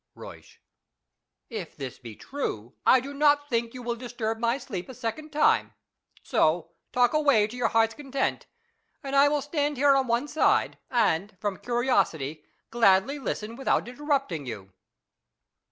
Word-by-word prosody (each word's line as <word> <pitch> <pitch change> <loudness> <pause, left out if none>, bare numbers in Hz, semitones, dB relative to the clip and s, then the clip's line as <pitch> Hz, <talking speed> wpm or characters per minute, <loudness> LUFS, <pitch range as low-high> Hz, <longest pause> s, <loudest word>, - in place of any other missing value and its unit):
Euysch. - - -12 0.9
If 210 -8 -6
this 135 -4 -7
be 115 -4 -10
true, 120 - -5
I 260 - +7
do 280 +3 -7
not 290 0 +3
think 230 0 -1
you 250 - -7
will 235 0 -2
disturb 235 -2 -4
my 235 +2 +1
sleep 190 -8 -6
a 260 - -9
second 250 +6 -5
time. 300 0 +2 0.5
So 165 +1 +1 0.2
talk 245 +1 +3
away 285 -9 +4
to 215 +3 -8
your 245 - +1
hearts' 225 0 +2
content, 275 -1 -3 0.6
and 275 0 -3
I 280 +1 +7
will 290 -1 0
stand 290 -1 -1
here 280 +1 +5
on 265 -1 +1
one 235 +5 0
side, 310 - +1
and, 205 -5 +1
from 205 -3 -2
curiosity, 195 - 0 0.3
gladly 230 +4 +3
listen 225 -4 -4
without 265 -2 0
interrupting 250 - -2
you. 100 -5 -8
240 Hz, 155 wpm, -27 LUFS, 200-275 Hz, 0.9 s, I